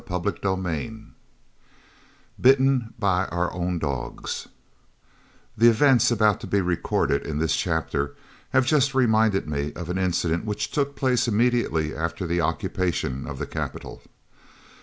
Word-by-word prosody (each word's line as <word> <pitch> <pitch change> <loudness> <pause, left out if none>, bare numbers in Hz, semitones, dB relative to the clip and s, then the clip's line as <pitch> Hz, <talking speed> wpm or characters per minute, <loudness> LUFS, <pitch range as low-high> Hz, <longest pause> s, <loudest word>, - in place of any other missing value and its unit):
CHAPTER 90 +2 -1
XXVI 95 +4 -4 1.3
BITTEN 130 -2 +3
BY 95 -4 +1
OUR 90 0 -1
OWN 90 0 -2
DOGS 70 -6 -4 1.1
The 115 +2 +6
events 125 0 +4
about 110 -4 +3
to - - -8
be 100 - +1
recorded 85 -5 0
in 75 - -3
this 80 +1 +1
chapter 80 -5 -1 0.3
have 130 -1 +3
just 140 -1 +2
reminded 110 -7 +3
me 75 0 -2
of 85 0 -5
an 95 - -2
incident 85 -2 0
which 105 -1 -3
took 140 -1 -1
place 125 -3 +1
immediately 115 -9 +1
after 85 +3 -3
the 85 0 0
occupation 80 -6 -2
of - - -6
the - - -3
capital. - - -6
95 Hz, 135 wpm, -24 LUFS, 85-120 Hz, 1.3 s, The